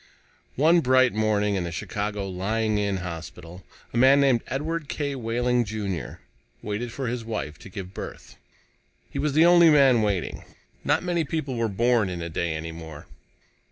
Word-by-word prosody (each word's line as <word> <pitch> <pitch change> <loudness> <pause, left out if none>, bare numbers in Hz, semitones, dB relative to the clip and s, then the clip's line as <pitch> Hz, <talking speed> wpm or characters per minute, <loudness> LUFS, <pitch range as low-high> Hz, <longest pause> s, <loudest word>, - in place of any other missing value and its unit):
One 165 +5 +5
bright 130 -2 +4
morning 105 -1 +1
in 95 -2 -1
the 85 - -4
Chicago 105 +4 -3
Lying 105 +3 -1
in 100 -1 0
Hospital, 85 +1 -8 0.3
a - - -2
man 135 +3 +6
named 135 -4 +3
Edward 155 +2 -3
K. 145 -2 -2
Wehling, 120 0 0
Jr., 100 - -5 0.4
waited 110 +3 -3
for 135 +2 -4
his 120 0 -3
wife 80 -10 -5
to - - -12
give 95 0 -8
birth. - - -9 0.8
He - - -4
was 150 -1 0
the 160 +3 +5
only 175 -1 +7
man 135 -6 +5
waiting. 100 -5 -2 0.4
Not - - +1
many 175 -2 0
people 145 -4 -3
were 115 -1 0
born 115 0 +2
a 85 -2 -5
day 80 0 -2
any 80 +1 -5
more. 80 -2 -10
110 Hz, 165 wpm, -25 LUFS, 95-135 Hz, 0.8 s, only